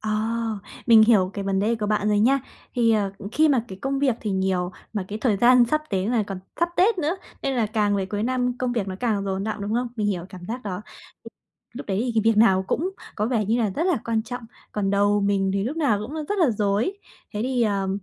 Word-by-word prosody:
Ờ, 215 - -3 0.8
mình 225 -2 +8
hiểu 210 -5 +4
cái 200 - -4
vấn 195 -1 0
đề 220 +3 +2
của 215 -2 -3
bạn 210 0 +1
rồi 210 -1 +3
nha. 265 +6 +4 0.3
Thì, 235 -2 +3
ờ, 200 -3 +1 0.2
khi 310 +4 +4
mà 250 -5 +2
cái 190 0 -8
công 270 0 -1
việc 270 -4 +2
thì 215 - -3
nhiều, 190 -2 0 0.2
mà 205 -3 -2
cái 210 - -4
thời 220 -4 +1
gian 240 +3 +6
sắp 305 +6 0
đến 195 +1 0
là 235 -3 +2
còn 195 -2 -6 0.2
sắp 340 - +3
Tết 390 +2 +3
nữa, 325 +3 0 0.3
nên 270 - 0
là 230 - +2
càng 210 -1 +1
về 190 -1 -1
cuối 205 +1 -3
năm 250 +1 0
công 250 -1 -1
việc 220 -5 -1
nó 190 - -4
càng 215 -5 0
dồn 195 0 -2
đọng, 215 -1 -3
đúng 205 +2 -2
không? 245 +1 0
Mình 210 -2 0
hiểu 180 -4 -1
cảm 185 - -10
giác 245 +2 -4
đó. 190 -3 -4 0.9
Lúc 270 +4 -8
đấy 195 0 -1
thì 245 - -1
cái 220 - +3
việc - - -5
nào 190 -4 +5
cũng 355 +5 0 0.3
có 210 - 0
vẻ 230 -3 +1
như 225 +4 +1
là 215 -4 +1
rất 315 - -2
là 365 -4 +2
quan 225 -1 0
trọng, 245 +1 -6 0.3
còn 200 -2 0
đầu 205 +1 +3
mình 200 -1 +1
thì 195 0 0
lúc 270 +8 -3
nào 280 -11 +2
cũng 250 +8 -7
rất 410 - -1
là 330 -8 +4
rối. 210 - 0 0.4
Thế 210 - -1
thì, 250 -1 0
ờ, 200 -3 0
215 Hz, 255 wpm, -24 LUFS, 200-250 Hz, 0.9 s, mình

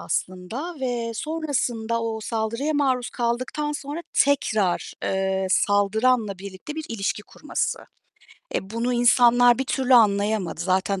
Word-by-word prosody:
aslında 220 - -4
ve 235 -3 -2
sonrasında, 245 -6 -2
o 225 -1 -3
saldırıya 230 +7 -2
maruz 260 -4 +1
kaldıktan 255 +5 -2
sonra 295 +3 -5
tekrar, 215 -10 +1
eee, 190 0 0
saldıranla 205 +2 +2
birlikte 195 +9 -8
bir 315 0 -5
ilişki 210 -2 -2
kurması. 300 +8 -3 0.8
E, 190 - -3
bunu 230 +3 -1
insanlar 245 0 +5
bir 265 - 0
türlü 260 -1 +2
anlayamadı. 205 -3 +3
Zaten 190 +1 0
230 Hz, 120 wpm, -24 LUFS, 205-260 Hz, 0.8 s, insanlar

